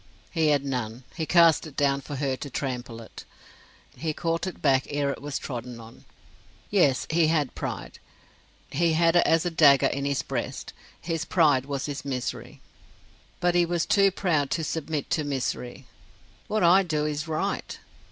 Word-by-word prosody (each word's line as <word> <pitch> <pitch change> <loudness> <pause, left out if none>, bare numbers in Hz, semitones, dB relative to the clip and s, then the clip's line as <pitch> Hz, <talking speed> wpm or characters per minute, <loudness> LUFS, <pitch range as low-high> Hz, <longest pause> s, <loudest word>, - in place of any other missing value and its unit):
He 160 -3 +1
had 145 -2 +2
none; 125 -2 -3
he 160 -3 -3
cast 170 -2 +5
it 145 - -13
down 140 -1 +2
for 145 - -7
her 135 -1 -1
to 140 - -7
trample 125 -4 -4
it; - - -12 0.7
he 160 -1 -3
caught 165 +3 -2
it 185 - -6
back 135 -2 +2
ere 145 -1 0
it - - -7
was 145 0 -3
trodden 120 -2 -6
on. 115 0 -14 0.7
Yes; 160 -10 +3
he 165 0 +3
had 155 -4 +1
pride: - - -6 0.7
he 165 +2 +2
had 165 +1 +3
it 175 - +6
as 165 +1 +3
a 175 - 0
dagger 145 -4 +6
in 140 0 -1
his 140 -1 0
breast: - - -4 0.3
his 165 -1 -3
pride 145 -7 +3
was 140 -2 -3
his 145 -2 -5
misery. 130 -3 -5 0.8
But 175 0 +2
he 175 0 +4
was 170 -1 0
too 200 -1 +4
proud 165 -7 0
to 165 - -1
submit 155 -2 -3
to 155 - +1
misery. 130 -3 -4 0.6
"What 215 -2 0
I 175 +3 +6
do 155 -5 -1
is 150 +1 -3
right." 155 -1 -3
150 Hz, 175 wpm, -26 LUFS, 135-165 Hz, 0.8 s, it